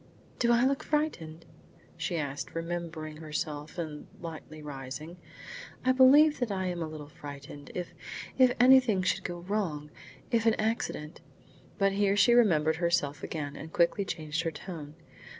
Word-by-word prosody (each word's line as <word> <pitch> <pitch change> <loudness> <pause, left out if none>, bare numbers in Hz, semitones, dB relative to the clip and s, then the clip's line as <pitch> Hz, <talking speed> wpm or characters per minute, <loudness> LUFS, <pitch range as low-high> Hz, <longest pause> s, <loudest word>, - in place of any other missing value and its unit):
"Do 240 -1 +3
I 240 +1 +4
look 275 +1 +1
frightened?" 170 - -2 0.5
she 175 - -2
asked, 145 -1 -4
remembering 165 -2 -4
herself 150 0 -4
and 155 -3 -5
lightly 155 -2 -8
rising. 145 +4 -7 0.7
"I 255 - +5
believe 280 +4 +6
that 245 -3 0
I 190 -1 -1
am 175 -1 -2
a 160 - -2
little 155 -2 -8
frightened. 145 -1 -10
If 180 -1 -4 0.4
if 255 -2 +6
anything 250 -6 +6
should - - 0
go 175 -1 -5
wrong! 170 -6 -2 0.4
If 230 -1 +2
an 225 - +5
accident 215 -8 -2 0.3
" - - -26
But 195 0 +3
here 200 0 +2
she 205 +4 +6
remembered 160 -10 +4
herself 160 -5 0
again 145 -3 -4
and 160 - -8
quickly 170 +4 +2
changed 155 -3 -3
her 165 - -1
tone. 155 -1 -8
170 Hz, 155 wpm, -30 LUFS, 150-210 Hz, 0.7 s, believe